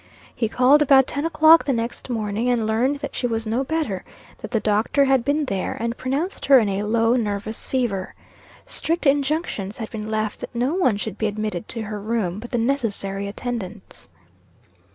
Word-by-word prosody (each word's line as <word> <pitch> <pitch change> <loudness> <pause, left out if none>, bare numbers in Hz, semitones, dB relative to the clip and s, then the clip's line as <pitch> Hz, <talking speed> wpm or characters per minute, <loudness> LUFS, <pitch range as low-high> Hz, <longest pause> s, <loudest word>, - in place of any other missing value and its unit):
He 225 - -1
called 260 +6 +5
about 270 -2 +6
ten 285 +3 -3
o'clock 320 0 +6
the 275 - +1
next 235 +2 -4
morning, 220 0 -1
and 240 -3 +1
learned 235 +6 +1
that - - -5
she 245 - -1
was 225 -1 -2
no 230 +5 0
better; 285 - -2 0.4
that - - -7
the 225 - +1
doctor 215 +7 +2
had 265 -3 +3
been 290 +3 +1
there, 195 -7 -3
and 230 +1 -2
pronounced 280 +10 -3
her 275 -1 +8
in 225 -4 +3
a 195 +1 -1
low 225 +3 +2
nervous 215 -2 -3
fever. 230 -8 -2 0.5
Strict 330 +1 -2
injunctions 275 - 0
had 220 - -6
been 215 -1 -5
left 215 -1 -2
that - - -8
no 250 +5 0
one 300 - +2
should 210 0 -5
be 220 - +1
admitted 210 -4 -3
to 230 -2 -5
her 210 -1 -5
room 210 -4 -1
but 240 +2 -8
the 245 - -1
necessary 220 -6 -1
attendants. 215 -2 -6
230 Hz, 190 wpm, -22 LUFS, 210-270 Hz, 0.5 s, her